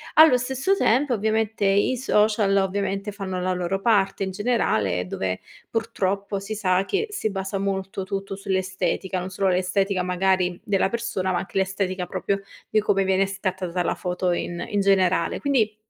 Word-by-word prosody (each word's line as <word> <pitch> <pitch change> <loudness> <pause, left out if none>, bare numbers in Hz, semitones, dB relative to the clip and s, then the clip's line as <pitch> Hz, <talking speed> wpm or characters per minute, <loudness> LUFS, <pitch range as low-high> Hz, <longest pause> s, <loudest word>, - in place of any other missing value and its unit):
Allo 310 -5 +8
stesso 265 +10 0
tempo, 260 - +2
ovviamente, 220 -1 0
i 200 +6 +3
social, 210 -4 +2
ovviamente, 195 +1 -1
fanno 190 -2 -4
la 185 0 0
loro 180 +2 -2
parte 200 -3 +2
in 190 - -2
generale, 110 - 0
dove 95 0 -2 0.3
purtroppo 200 -3 -1
si 200 +2 -5
sa 190 -2 +1
che 420 +3 -1
si 310 - -2
basa 195 0 -3
molto 195 -1 -2
tutto 195 0 -4
sull'estetica, 190 -1 -2
non 185 +1 -5
solo 190 +1 +1
l'estetica 185 +1 +1
magari 180 -1 +1
della 195 -1 +1
persona, 225 -5 -2
ma 175 - +1
anche 195 - -5
l'estetica 190 -1 -1
proprio 195 +2 -2 0.3
di 215 - +3
come 195 -2 +2
viene 190 +1 +3
scattata 185 -2 -3
la - - 0
foto 180 0 -1
in 175 0 -3
in 205 -1 +1
generale. 185 -3 +2
Quindi, 230 -7 +1
195 Hz, 160 wpm, -24 LUFS, 185-210 Hz, 0.3 s, Allo